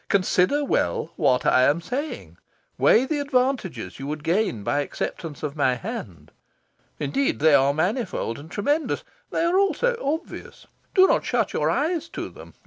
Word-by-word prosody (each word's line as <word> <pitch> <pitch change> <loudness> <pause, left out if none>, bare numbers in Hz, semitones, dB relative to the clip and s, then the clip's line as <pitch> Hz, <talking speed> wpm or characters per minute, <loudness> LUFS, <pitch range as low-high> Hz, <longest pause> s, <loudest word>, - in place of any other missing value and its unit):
Consider 200 +8 +2
well 85 - -1
what 125 0 +2
I 130 - +5
am 145 +5 +3
saying. 270 - -5 0.4
Weigh 245 - +5
the 295 +2 -1
advantages 260 - -1
you 135 - -5
would 150 0 -4
gain 170 - 0
by 145 - 0
acceptance 150 +2 -5
of 150 -1 -3
my 130 -4 +2
hand. 110 - -7 0.7
Indeed, 140 -4 0
they 155 +3 +4
are 140 0 +5
manifold 175 - -2
and 150 +3 -11
tremendous. 290 - -1 0.3
They - - -1
are 345 +3 +3
also 480 +5 +2
obvious: 315 +5 -5 0.3
do 375 -1 +8
not - - +2
shut - - 0
your - - +1
eyes 330 +1 0
to - - -4
them. - - -14
185 Hz, 160 wpm, -24 LUFS, -, 0.7 s, do